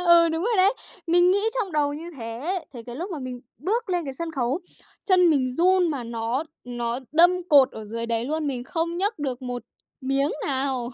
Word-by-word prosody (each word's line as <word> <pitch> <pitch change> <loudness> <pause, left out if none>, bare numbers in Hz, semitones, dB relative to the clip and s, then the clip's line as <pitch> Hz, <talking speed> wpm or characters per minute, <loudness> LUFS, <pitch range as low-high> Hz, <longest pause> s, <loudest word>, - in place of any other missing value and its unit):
Ừ, 340 -1 +7
đúng 325 +1 -1
rồi 455 +2 +1
đấy! 390 +4 +5 0.3
Mình 350 +1 +5
nghĩ 395 +2 +3
trong 415 -8 -2
đầu 290 -1 +1
như 330 +3 -7
thế. 245 +10 -3
Thế 240 -3 -8
cái 240 0 -7
lúc 355 +7 -5
mà 330 - -4
mình 255 -2 -6 0.2
bước 430 - -1
lên 350 -2 0
cái 270 -2 -5
sân 335 +4 -4
khấu, 265 +3 -1 0.4
chân 365 -3 +5
mình 265 -4 +2
run 365 0 +4
mà 275 -5 -3
nó 230 +4 -2 0.2
nó 240 -1 -2
đâm 350 +2 +4
cột 280 -4 +7
ở 220 - -7
dưới 230 +2 -4
đấy 230 0 -1
luôn, 305 +3 -2
mình 255 -3 -3
không 335 +4 -2
nhấc 405 +3 -1
được 265 -3 -3
một 245 -1 -4 0.4
miếng 275 +2 +1 0.2
nào! 265 -3 -1
295 Hz, 215 wpm, -25 LUFS, 250-350 Hz, 0.4 s, Ừ